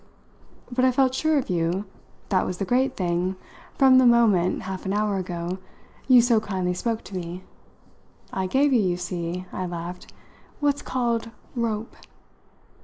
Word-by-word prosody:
But 255 +1 +1
I 260 - +5
felt 260 0 +2
sure 315 +3 +2
of 275 - -1
you 175 +3 0 0.4
that 185 -2 +2
was 180 - -3
the 195 - -2
great 260 +5 +1
thing 180 0 0 0.4
from 260 -1 +7
the 260 - +5
moment, 215 -7 +3
half 185 0 -5
an 190 - 0
hour 210 -1 +1
ago, 180 0 -4 0.5
you 250 -3 +7
so 235 -2 +4
kindly 185 -4 -2
spoke 225 +4 -2
to 195 - -9
me. 180 +1 -5 0.9
I 190 -1 -1
gave 275 +6 +3
you, 240 - +4
you 180 -3 0
see," 180 0 -4
I 185 - -3
laughed, 175 +1 -7 0.5
"what's 290 -1 +1
called 235 -3 -1 0.3
'rope.'" 230 -2 -2
200 Hz, 160 wpm, -25 LUFS, 180-245 Hz, 0.9 s, from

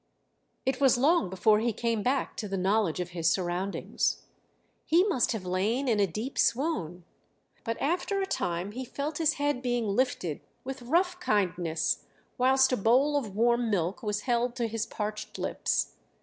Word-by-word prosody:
It 265 +1 -1
was 265 -3 +5
long 285 - +3
before 210 +3 +3
he 235 +2 +1
came 230 0 -1
back 260 +5 0
to 215 - -3
the 195 0 -3
knowledge 190 -2 +1
of 180 -1 -3
his 165 -2 +1
surroundings. 185 +1 -1 0.6
He 335 +3 +4
must 375 - +1
have 210 -5 -5
lain 210 +9 0
in 225 -4 +2
a 200 - +4
deep 215 +10 -5
swoon; 185 - 0 0.6
but 230 -1 -3
after 360 +6 0
a 385 - 0
time 175 - -2
he 255 +4 -5
felt 290 +5 -4
his 320 -1 +3
head 290 -4 -1
being 245 -2 0
lifted 200 - -1 0.2
with 265 0 -6
rough 355 +8 +1
kindness, 180 - 0 0.4
whilst 265 +1 +4
a 255 - +2
bowl 255 +8 +3
of 220 -9 -2
warm 235 +1 +2
milk 185 -3 -1
was 210 -1 -2
held 240 0 0
to 240 -2 -1
his 225 0 -3
parched 210 0 -5
lips. - - -1
230 Hz, 170 wpm, -29 LUFS, 195-265 Hz, 0.6 s, was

